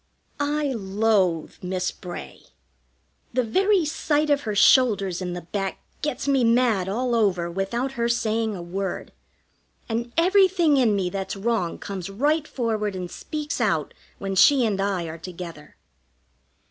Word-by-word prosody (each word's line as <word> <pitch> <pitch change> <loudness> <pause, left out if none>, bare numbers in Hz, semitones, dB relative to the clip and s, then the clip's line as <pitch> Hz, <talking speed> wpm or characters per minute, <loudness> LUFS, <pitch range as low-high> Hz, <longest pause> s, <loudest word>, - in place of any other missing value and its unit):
I 290 -1 0
loathe 195 -5 +1
Miss 185 0 -2
Bray. 175 -1 -9 0.9
The 255 +1 +2
very 380 - +2
sight 300 0 0
of 285 0 +3
her 210 - -1
shoulders 200 -5 +4
in 180 -1 -3
the 175 - -6
back 195 +2 -3 0.2
gets 285 -2 -3
me 270 -3 +3
mad 230 -5 +3
all 245 +4 -1
over 185 -7 +1
without 215 +9 -2
her 235 -3 -1
saying 225 -2 0
a 175 - -6
word, 190 +2 -4 0.8
and 235 +1 -3
everything 365 -3 +4
in 235 -6 +3
me 185 -3 -1
that's 195 +1 -4
wrong 200 -4 -1
comes 195 -2 -6
right 295 +9 +1
forward 215 -5 -2
and 180 -1 -5
speaks 300 -4 -4
out 165 -9 0 0.2
when 195 -1 -4
she 250 +7 +5
and 200 -3 0
I 195 -3 0
are 165 0 -7
together. 170 -3 -9
215 Hz, 145 wpm, -24 LUFS, 190-260 Hz, 0.9 s, she